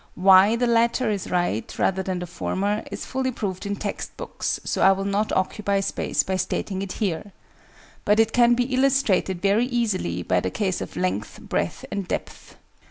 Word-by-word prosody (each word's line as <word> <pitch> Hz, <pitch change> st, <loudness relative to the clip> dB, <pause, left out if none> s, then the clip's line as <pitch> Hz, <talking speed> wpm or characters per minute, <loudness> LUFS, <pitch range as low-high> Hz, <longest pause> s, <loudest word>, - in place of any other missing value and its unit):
Why 190 Hz, +4 st, +6 dB
the 245 Hz, +1 st, +1 dB
latter 235 Hz, 0 st, +2 dB
is 200 Hz, -3 st, -3 dB
right, 175 Hz, -, -1 dB
rather 190 Hz, 0 st, +1 dB
than 185 Hz, -1 st, -3 dB
the 180 Hz, -, -4 dB
former, 200 Hz, +4 st, -2 dB
is -, -, -5 dB
fully 260 Hz, 0 st, -1 dB
proved 200 Hz, -4 st, -4 dB
in 205 Hz, -, -1 dB
text 200 Hz, 0 st, -5 dB
books, -, -, -3 dB
so -, -, -2 dB
I 195 Hz, -, +7 dB
will 195 Hz, 0 st, -3 dB
not 200 Hz, +2 st, 0 dB
occupy 200 Hz, +1 st, 0 dB
space -, -, 0 dB
by 190 Hz, 0 st, -1 dB
stating 190 Hz, 0 st, -2 dB
it 195 Hz, -2 st, -4 dB
here: 200 Hz, -1 st, -3 dB, 0.7 s
but 210 Hz, +1 st, +3 dB
it 225 Hz, 0 st, +3 dB
can 240 Hz, -1 st, +5 dB
be 245 Hz, -, +2 dB
illustrated 255 Hz, -9 st, +2 dB
very 205 Hz, +5 st, +3 dB
easily 205 Hz, -, -1 dB
by 90 Hz, +1 st, +2 dB
the 95 Hz, -, -2 dB
case 190 Hz, -, -2 dB
of -, -, -7 dB
length, 95 Hz, +3 st, -2 dB
breadth, -, -, -3 dB
and 200 Hz, -3 st, -3 dB
depth. -, -, -5 dB
200 Hz, 185 wpm, -24 LUFS, 185-225 Hz, 0.7 s, I